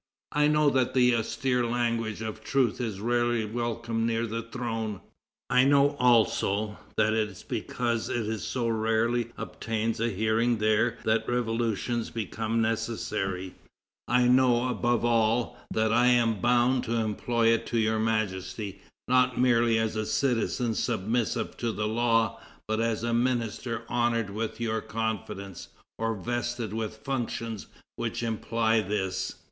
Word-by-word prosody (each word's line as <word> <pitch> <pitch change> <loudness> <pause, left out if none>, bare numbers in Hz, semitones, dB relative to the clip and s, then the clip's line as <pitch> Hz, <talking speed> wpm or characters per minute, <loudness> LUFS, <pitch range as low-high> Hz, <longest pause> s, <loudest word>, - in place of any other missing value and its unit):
I 150 0 +3
know 150 -1 +4
that 130 -1 +1
the 125 -1 +5
austere 125 +2 0
language 115 -2 -1
of 110 0 -6
truth 125 -3 +1
is 110 -5 -3
rarely 120 0 +1
welcomed 115 0 -2
near 115 0 0
the 115 +1 -3
throne; 115 -3 -4 0.5
I 125 +1 +4
know, 140 +1 +5
also, 110 -3 +2 0.2
that 110 0 +3
it 110 -1 +1
is 95 - -12
because 120 -2 -2
it 110 -2 -2
so 120 +5 -2
rarely 115 +1 +1
obtains 115 0 -3
a 115 +1 +1
hearing 110 +3 +1
there 110 +2 +2
that 110 0 +1
revolutions 120 -1 -1
become 115 +1 -2
necessary; 95 -5 -2 0.5
I 125 +1 +3
know, 125 -1 +4
above 120 -1 +1
all, 115 0 +2
that 110 0 +1
I 120 +1 +4
am 115 -4 +3
bound 125 +1 +3
to 115 - -1
employ 115 +1 +1
it 115 0 +1
to 120 - -1
Your 110 0 +2
Majesty, 100 -2 -2 0.3
not 125 -1 +3
merely 120 -2 +4
as 110 -1 0
a 110 0 -2
citizen 115 +1 0
submissive 110 -1 -1
to 120 -1 -1
the 105 -1 -2
law, 115 -1 +1 0.3
but 110 +1 0
as 115 -1 0
a 120 0 0
minister 120 -1 -1
honored 120 -3 0
with 110 +3 -4
your 110 -1 -1
confidence, 105 -4 -4 0.3
or 115 0 0
vested 120 +1 -3
with 110 -1 -3
functions 115 -5 -4 0.3
which 120 0 -3
imply 115 0 +1
this." 95 -2 -2
115 Hz, 140 wpm, -28 LUFS, 110-120 Hz, 0.5 s, the